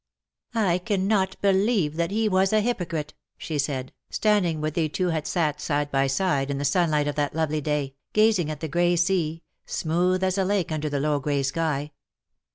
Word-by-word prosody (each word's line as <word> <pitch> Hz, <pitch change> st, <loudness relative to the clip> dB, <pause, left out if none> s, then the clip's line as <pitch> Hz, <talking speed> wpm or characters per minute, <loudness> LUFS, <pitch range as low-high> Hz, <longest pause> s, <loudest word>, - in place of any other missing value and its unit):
" -, -, -32 dB
I 185 Hz, -6 st, +2 dB
cannot 195 Hz, 0 st, 0 dB
believe 195 Hz, -5 st, +2 dB
that 170 Hz, 0 st, 0 dB
he 220 Hz, +2 st, +1 dB
was 190 Hz, -1 st, +2 dB
a 215 Hz, -, +4 dB
hypocrite,^^ 175 Hz, -9 st, -2 dB, 0.2 s
she 155 Hz, -3 st, -4 dB
said, 135 Hz, -2 st, -2 dB, 0.2 s
standing 200 Hz, -7 st, +1 dB
where 155 Hz, 0 st, -1 dB
they 160 Hz, 0 st, 0 dB
two 180 Hz, +4 st, -1 dB
had 160 Hz, -2 st, -2 dB
sat 150 Hz, -4 st, 0 dB
side 145 Hz, -1 st, -1 dB
by 135 Hz, 0 st, +2 dB
side 140 Hz, -1 st, 0 dB
in 140 Hz, -, -1 dB
the 140 Hz, -, -2 dB
sunlight 150 Hz, 0 st, +2 dB
of 145 Hz, -, -1 dB
that 145 Hz, 0 st, -1 dB
lovely 155 Hz, -1 st, 0 dB
day, 145 Hz, -2 st, -1 dB, 0.2 s
gazing 215 Hz, -7 st, +3 dB
at 150 Hz, -1 st, -5 dB
the 160 Hz, -, -2 dB
grey 175 Hz, +3 st, +2 dB
sea, 170 Hz, -2 st, 0 dB, 0.2 s
smooth 180 Hz, +3 st, 0 dB
as 190 Hz, +1 st, +1 dB
a -, -, +3 dB
lake 190 Hz, -3 st, 0 dB
under 155 Hz, -1 st, -2 dB
the 145 Hz, -1 st, -1 dB
low 150 Hz, 0 st, +1 dB
grey 140 Hz, 0 st, -1 dB
sky. 150 Hz, 0 st, -1 dB
165 Hz, 195 wpm, -25 LUFS, 150-190 Hz, 0.2 s, a